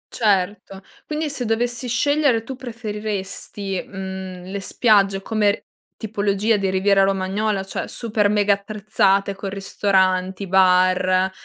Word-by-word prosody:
Certo. 195 -2 0 0.2
Quindi 305 +1 -2
se 275 -3 -4
dovessi 240 +2 -1
scegliere 270 -1 +2
tu, 265 +3 -7
preferiresti, 210 -5 -5
mhmm, 190 -1 -7
le 190 +2 -5
spiagge 195 -1 +2
come 210 -1 0 0.3
tipologia 205 0 0
di 195 -1 -1
Riviera 195 +1 +3
Romagnola, 195 +1 0
cioè 195 - -5
super 215 -3 0
mega 205 -1 +3
attrezzate, 200 -1 0
con 195 0 -6
ristoranti, 190 -1 0
bar, 185 0 +3
200 Hz, 115 wpm, -21 LUFS, 190-220 Hz, 0.3 s, Riviera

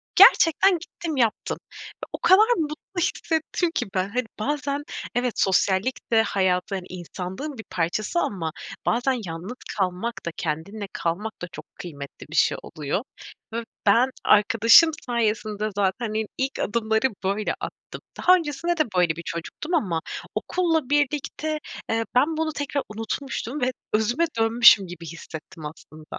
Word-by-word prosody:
Gerçekten 355 +4 +7
gittim, 330 -3 -6
yaptım 230 -4 +1 0.4
ve - - -8
o - - -2
kadar 380 +6 +6
mutlu 315 +4 -4
hissettim 325 +2 0
ki - - 0
ben. 185 +1 0
Hani, 250 +2 -1
bazen, 285 +3 -1 0.3
evet, 245 -1 +1
sosyallik 190 +6 +1
de 225 -1 +6
hayatın, 190 -1 0
insanlığın 185 - -6
bir 220 - -7
parçası 210 - -1
ama 165 - -2 0.3
bazen 245 +1 +1
yalnız 170 +8 -6 0.2
kalmak 190 +5 -1
da, 170 - -2
kendinle 185 +7 -3
kalmak 190 +6 -3
da, 180 - -4
çok - - -9
kıymetli 145 -5 -9
bir 160 - -7
şey - - +3
oluyor 155 - -3 0.5
ve 230 0 -2 0.2
ben 235 +6 +5 0.2
arkadaşım 230 +9 +7
sayesinde 215 -3 0
zaten, 205 +3 0
iii, 215 -1 -1
ilk 265 +1 -2
adımları 220 +3 +1 0.2
böyle 200 +2 0
attım. - - -8 0.2
Daha 365 +1 +6
öncesinde 335 +1 -1
de 310 - +4
böyle 170 -3 +3
bir 170 - -7
çocuktum 170 - -5
ama 175 - 0 0.3
okulla 325 -7 0
birlikte, 295 +1 0 0.3
eee, 225 0 +1
ben 310 +5 +3
bunu 315 -1 -1
tekrar 285 0 -2
unutmuştum 235 +4 -4
ve 255 +1 +2 0.2
özüme 240 +10 +2
dönmüşüm 225 -4 +7
gibi 170 -1 -9
hissettim, 160 0 -9
aslında. 155 0 -10
225 Hz, 140 wpm, -24 LUFS, 185-285 Hz, 0.5 s, Gerçekten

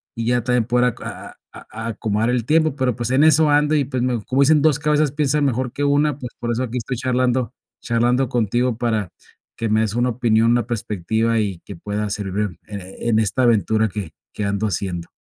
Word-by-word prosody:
y 115 -1 -3
ya 125 -1 +1
también 125 -1 +1
poder 125 +1 +2
aco - - -12
a - - -8 0.2
a 115 +1 -8
acomodar 110 0 -1
el 120 -2 -1
tiempo, 155 -1 +2
pero, 130 -4 0
pues, 120 -1 -2
en 135 +4 +4
eso 155 0 +5
ando 150 +1 +3
y, 145 - +2
pues, 130 -2 -2
me 120 -4 -1
como 130 +2 +1
dicen: 150 +1 +4
"2 155 -3 +3
cabezas 150 -1 +2
piensan 150 0 +1
mejor 125 -1 -1
que 145 - -3
una", 145 0 +2
pues, 125 -2 -7
por 120 - -2
eso 120 +2 -1
aquí 125 0 -4
estoy 125 +1 -4
charlando 125 -1 0 0.3
charlando 120 +2 +1
contigo 120 +1 0
para 110 -6 -1 0.5
que 115 - -2
me 110 +1 +3
des 110 0 -1
una 125 +1 +1
opinión, 115 -1 +2
una 120 -2 +1
perspectiva 110 0 -1
y 100 -5 -2
que - - -8
pueda 105 +4 -3
servir, 100 -3 -3
eh, 95 -2 -8
en 115 -2 +2
esta 110 +4 0
aventura 110 -1 +2
que 100 -5 -6 0.2
que 105 - -3
ando 100 +2 -1
haciendo. 85 -2 -3
120 Hz, 215 wpm, -21 LUFS, 110-130 Hz, 0.5 s, eso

